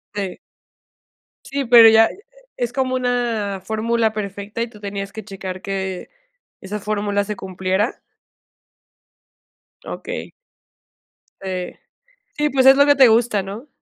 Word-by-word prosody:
Sí. 195 -3 -4 1.1
Sí, 275 0 -3
pero 230 -2 +9
ya, 225 0 +6 0.5
¿es 240 -1 -2
como 255 0 -1
una 235 -6 -1
fórmula 220 +2 0
perfecta 205 +1 -5
y 235 - -2
tú 210 - -15
tenías 200 -1 -5
que 220 -1 -9
checar 190 -2 -7
que 190 -2 -4 0.5
esa 205 +2 -5
fórmula 205 -1 -1
se 210 0 -4
cumpliera? 190 +4 -2 1.8
Okey. - - -6 1.1
Eh, 185 -2 -5 0.6
sí 300 0 +1
pues 265 -1 +2
es 270 0 +9
lo 285 +1 +5
que 285 - +6
te 260 -3 +7
gusta, 225 -2 +2
¿no? 205 +9 -8
215 Hz, 125 wpm, -20 LUFS, 195-240 Hz, 1.8 s, pero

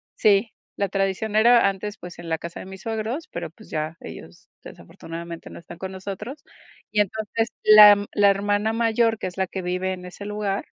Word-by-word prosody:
Sí, 215 +1 +3 0.3
la 200 -2 -1
tradición 195 +2 -1
era 235 -1 +6
antes, 200 +2 -6
pues, 175 -1 -11
en 170 - -9
la 160 0 0
casa 170 +1 -8
de - - -8
mis 190 0 -10
suegros, 225 +7 -3
pero, - - -5
pues, - - -17
ya, 155 +1 -3
ellos - - -11
desafortunadamente 170 0 -9
no - - -10
están 170 0 -12
con 190 0 -6
nosotros. 200 +9 -7 0.5
Y 210 - 0
entonces 220 +2 -2 0.2
la 215 -1 +10
m 205 0 -2
la 205 -1 +5
hermana 205 +2 +1
mayor, 230 0 +2
que 185 - -4
es 180 - -9
la 190 - 0
que 190 - -5
vive 185 +1 -2
en 180 -1 -9
ese 185 +3 -9
lugar, 210 -1 -2
200 Hz, 200 wpm, -23 LUFS, 185-215 Hz, 0.5 s, la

